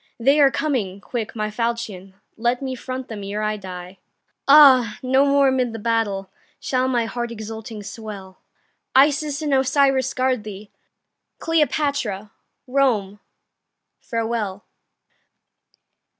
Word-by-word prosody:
They 275 +5 +4
are 280 -2 +7
coming! 240 -11 -2
quick, 225 +2 -5
my 215 -1 -2
falchion, 215 -5 -4 0.2
Let 240 +2 0
me 265 -1 -4
front 255 0 -6
them 210 -3 -7
ere 205 +2 -3
I 215 0 0
die. 185 -2 -9 0.5
Ah! 265 -6 +7
no 265 +2 +3
more 280 0 +4
amid 255 -3 0
the - - -5
battle 210 -4 -1 0.3
Shall 255 0 0
my 240 -3 +1
heart 240 +1 -4
exulting 220 -1 -7
swell; 200 -3 -9 0.6
Isis 290 +2 +3
and 295 -2 0
Osiris 270 0 +2
guard 255 -3 0
thee! 205 0 -9 0.7
Cleopatra, 280 -10 0 0.3
Rome, 240 -7 +1 0.8
farewell! 225 -4 -3
235 Hz, 120 wpm, -22 LUFS, 210-265 Hz, 0.8 s, are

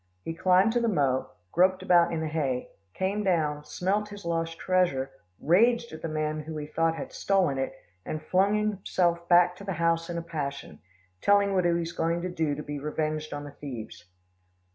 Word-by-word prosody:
He 165 - -4
climbed 185 +5 +3
to 240 - +2
the 235 - +1
mow, 135 - +1 0.2
groped 185 +2 +3
about 175 -1 +4
in 165 -1 -2
the 160 - -1
hay, 140 -5 -2 0.3
came 200 +3 -1
down, 155 -6 +1
smelt 200 +6 -1
his 205 -2 -10
lost 165 -1 -2
treasure, 175 -8 +1 0.3
raged 235 +8 +3
at 155 - -8
the - - -3
men 155 0 -2
who 155 +1 -6
he 150 - -4
thought 165 +2 0
had - - -7
stolen 180 -9 +1
it, 135 0 -2 0.3
and 155 - -4
flung 190 +6 +2
himself 185 -5 0
back 175 0 +5
to 200 - -10
the 195 -1 -3
house 165 0 0
in 170 - -3
a 170 - -3
passion, 145 -4 -5 0.4
telling 200 -1 +4
what 185 -2 +2
he 175 - +4
was 170 0 -1
going 170 +1 -1
to 180 - -2
do 160 -4 -1
to 150 - -6
be 145 0 -5
revenged 155 +1 -2
on 145 0 -5
the 145 - -8
thieves. 125 -10 -8
165 Hz, 200 wpm, -28 LUFS, 150-185 Hz, 0.4 s, back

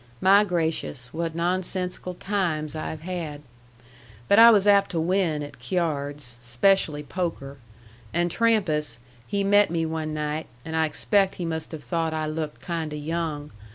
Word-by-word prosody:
My 200 +2 +6
gracious, 160 -9 -2
what 165 0 -3
nonsensical 180 +1 -2
times 170 -7 -2
I 155 - -4
have 155 - -7
had! 165 -5 -5 0.8
But 200 - +6
I 230 +1 +11
was 205 -3 +5
apt 200 -1 +5
to 170 - -2
win 165 -3 +1
at 145 - -10
cyards, 145 -8 -2
'specially 150 +5 +2
poker. 145 -4 -4 0.5
And 175 0 0
Trampas, 165 - +1 0.3
he 200 -1 0
met 205 +1 +5
me 165 -1 0
one 160 -1 -3
night, 150 +1 -3 0.2
and 160 0 -4
I 160 0 +2
expect 195 +5 +2
he 175 - -4
must 160 -1 -4
have 155 -3 -7
thought 160 +5 -1
I 155 0 -1
looked 155 0 -4
kind 165 -3 -3
o' 150 - -4
young. 150 -1 -3
165 Hz, 160 wpm, -25 LUFS, 150-185 Hz, 0.8 s, I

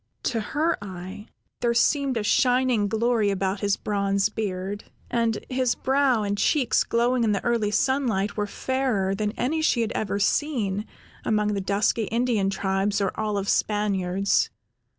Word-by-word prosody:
To 235 - 0
her 310 +9 -1
eye, 190 +2 -8 0.3
there 235 -1 +1
seemed 270 +1 +2
a 220 - -1
shining 250 -1 +2
glory 225 0 +1
about 195 0 -1
his 200 -1 0
bronze 200 -1 0
beard, 205 -1 -4 0.3
and 230 -2 +1
his 255 -1 0
brow 265 -4 +2
and 205 0 -2
cheeks 270 -1 +2
glowing 240 +1 +1
in 215 -2 +2
the 195 - -2
early 235 -3 +1
sunlight, 225 -4 0
were 210 -1 -1
fairer 245 -6 -1
than 210 +1 -1
any 305 +7 -1
she 260 -6 +2
had 225 - -1
ever 200 -2 -2
seen 210 -4 0 0.4
among 210 -1 +1
the 200 - -1
dusky 200 +3 +1
Indian 230 -3 0
tribes 195 +1 0
or 195 -2 0
olive 210 -2 -2
Spaniards. 200 -3 +1
210 Hz, 150 wpm, -25 LUFS, 200-245 Hz, 0.4 s, seemed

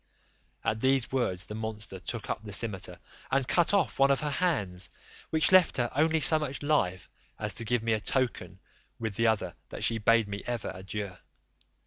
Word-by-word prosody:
At 110 - 0
these 130 0 +2
words 95 -9 -1
the 105 - -8
monster 110 -3 -5
took 90 - -5
up - - -3
the 105 -2 -9
cimeter 100 -3 -2 0.3
and 135 -1 +1
cut 175 -2 +3
off 200 -8 +1
one 135 0 +5
of 140 - +2
her 150 -1 -1
hands, 105 - -1 0.4
which 160 +2 +3
left 185 -2 +6
her 120 -2 0
only 160 +2 +3
so 155 +2 +7
much 145 -2 -4
life 95 -12 0 0.3
as 105 -2 -3
to 115 +2 -6
give 120 +1 0
me 115 -1 +1
a 110 - +1
token 100 -8 -1 0.4
with 110 -2 -3
the 115 +1 +2
other 110 -2 0 0.2
that - - -6
she 115 -1 +1
bade 115 0 +3
me 100 0 -5
for - - -8
ever 120 -3 -3
adieu. 95 +1 -6
115 Hz, 195 wpm, -29 LUFS, 100-135 Hz, 0.4 s, so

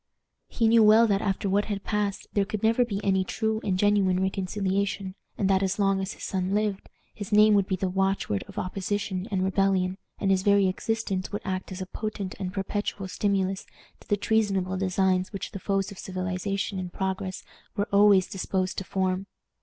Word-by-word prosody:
He 230 - +1
knew 230 0 +6
well 220 +2 +7
that 200 -2 +1
after 200 0 -1
what 200 +2 +2
had 200 -2 -4
passed 210 -2 -1
there 200 - +3
could 210 +1 -5
never 230 +3 +4
be 205 -5 -3
any 190 -1 +2
true 220 +3 -1
and 185 -2 0
genuine 195 -2 +3
reconciliation, 190 0 -1 0.2
and 195 - +1
that, 190 -1 +3
as 195 0 0
long 195 -1 +2
as 190 +2 -3
his - - -12
son 190 0 -1
lived, 210 -2 -1 0.2
his 205 0 -7
name 210 +1 +6
would 200 -2 +3
be 190 - 0
the 185 +1 -1
watchword 190 - 0
of - - -13
opposition 190 +1 -2
and 190 -3 0
rebellion, 190 -1 +1 0.2
and 195 - +1
his 190 -1 +3
very 200 0 +4
existence 195 -1 -2
would 205 - -4
act 185 -1 -3
as 185 0 -6
a - - -3
potent 200 -1 -5
and 185 -2 -3
perpetual 195 0 -3
stimulus 195 -1 -1 0.3
to - - -19
the 205 - +2
treasonable 195 -3 +1
designs 185 0 +1
which 195 -2 -5
the 195 - -6
foes 195 0 -1
of 200 - -10
civilization 190 +1 -3
and 180 -1 -5
progress 190 0 -3 0.3
were 205 -1 0
always 200 -2 +6
disposed 185 0 -2
to - - -5
form. 190 0 -1
195 Hz, 195 wpm, -27 LUFS, 190-205 Hz, 0.3 s, well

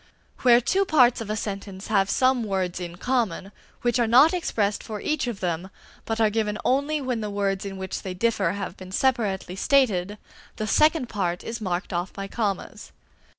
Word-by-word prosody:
Where 240 -2 +6
two 375 +11 +1
parts 255 -10 +4
of 220 - -6
a 215 - -1
sentence 200 -2 -5
have 195 -2 +2
some 255 0 +2
words 190 -4 -2
in 175 -1 -6
common, 210 -4 -1 0.3
which 240 +1 +2
are 235 - +3
not 260 +9 +6
expressed 210 - 0
for 215 -2 -6
each 305 -1 -1
of 230 -5 -5
them, 175 +1 -2 0.4
but 225 0 -2
are 220 -2 +3
given 215 -1 -1
only 285 +4 +1
when 255 -4 -2
the 210 - -3
words 200 -1 -1
in 195 -1 -6
which 190 -1 -5
they 185 -1 -5
differ 200 -3 +1
have 200 -2 -5
been 185 0 -11
separately 205 -6 0
stated, 210 -5 +2 0.4
the 215 - -3
second 305 +4 +3
part 180 -5 -2
is 230 0 -5
marked 185 -1 -3
off 175 +2 -2
by 195 0 -5
commas. 200 -3 -3
210 Hz, 190 wpm, -25 LUFS, 190-245 Hz, 0.4 s, Where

